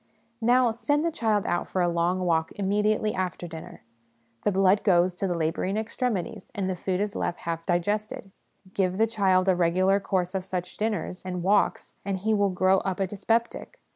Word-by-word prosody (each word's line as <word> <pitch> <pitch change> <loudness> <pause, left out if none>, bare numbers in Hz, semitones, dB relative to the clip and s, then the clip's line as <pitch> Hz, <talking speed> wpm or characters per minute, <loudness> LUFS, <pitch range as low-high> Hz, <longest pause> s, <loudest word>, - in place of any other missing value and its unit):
Now, 245 +1 +4
send 290 +7 0
the 335 - +1
child 215 -8 0
out 175 - -1
for 185 - -3
a 175 - +3
long 175 +2 0
walk 165 -3 +1
immediately 210 +2 +1
after 180 -1 -3
dinner 160 -1 -10 0.6
the 210 - +1
blood 195 +1 +3
goes 180 -2 +3
to 195 +2 -2
the 175 - -1
labouring 165 +5 -1
extremities, 220 -3 -3
and 195 -2 -1
the 185 - -1
food 180 +1 -2
is 205 0 -2
left 175 - -2
half 165 -1 -4
digested; 200 +3 -1 0.4
give 185 -1 0
the 220 - +4
child 195 -4 +2
a 190 - +4
regular 185 +3 +2
course 185 -2 -1
of 190 -1 -2
such 180 -1 -5
dinners 210 -4 -2
and 180 -1 -4
walks, 200 +2 +1
and 195 -1 -2
he 215 +4 0
will 205 -1 +2
grow 185 +1 +3
up 190 0 -3
a 195 - +2
dyspeptic. 225 - -2
190 Hz, 190 wpm, -26 LUFS, 180-210 Hz, 0.6 s, Now